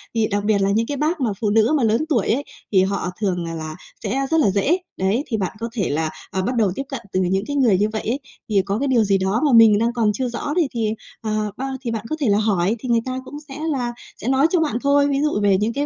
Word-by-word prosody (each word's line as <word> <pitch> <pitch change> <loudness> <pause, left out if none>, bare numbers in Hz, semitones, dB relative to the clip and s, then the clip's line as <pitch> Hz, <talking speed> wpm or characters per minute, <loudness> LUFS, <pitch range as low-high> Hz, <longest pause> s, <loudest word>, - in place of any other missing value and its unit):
thì 220 -1 +2
đặc 205 -1 -1
biệt 205 -2 +2
là 195 - +2
những 225 +3 +1
cái 285 - -3
bác 310 +2 0
mà 245 - +1
phụ 210 - +1
nữ 225 +6 +3
mà 270 - 0
lớn 225 +7 +2
tuổi 235 -10 +1
ấy, 265 +6 +1 0.3
thì 190 -3 +5
họ 190 -2 -1
thường, 180 -4 0
à, 165 - -5
là 155 -1 -5 0.3
sẽ 275 +2 -1
rất 325 - +3
là 270 - +4
dễ. 235 - +2 0.2
Đấy, 195 +9 +1
thì 225 - -1
bạn 190 +2 -3
có 230 - -3
thể 200 -7 -1
là, 155 +2 0 0.2
ờ, 190 - -1
bắt 245 +7 -1
đầu 215 -5 +2
tiếp 275 - -3
cận 270 -4 -4
từ 185 - +2
những 190 +2 +1
cái 285 - -3
người 240 -9 +4
như 210 +3 +1
vậy 220 - -2
ấy, 245 +5 -2 0.3
thì 200 -2 +3
có 200 +2 -1
cái 280 - 0
điều 245 -4 +3
gì 200 -1 +2
đó 190 +5 0
mà 290 - +3
mình 225 -2 +7
đang 230 +2 +1
còn 225 -3 +2
chưa 250 +4 -2
rõ 240 +5 -3
thì 335 -5 +3
thì, 225 -3 -1 0.3
ờ, 215 -1 -1
bao 270 +1 -3
thì 240 -3 -3
bạn 225 -1 -4
có 310 - -1
thể 275 -7 +1
là 205 - +4
hỏi 205 -1 +1
thì 250 - -6
người 235 -1 +4
ta 255 0 -3
cũng 290 - -9
sẽ 270 - -9 0.2
là 245 -4 -2 0.3
sẽ - - -5
nói 270 +4 +4
cho 355 - +2
bạn 295 -8 0
thôi, 285 0 +3
ví 280 0 0
dụ 300 -8 +1
về 200 -2 +4
những 215 +4 0
cái 285 +2 -1
225 Hz, 300 wpm, -21 LUFS, 200-270 Hz, 0.3 s, mình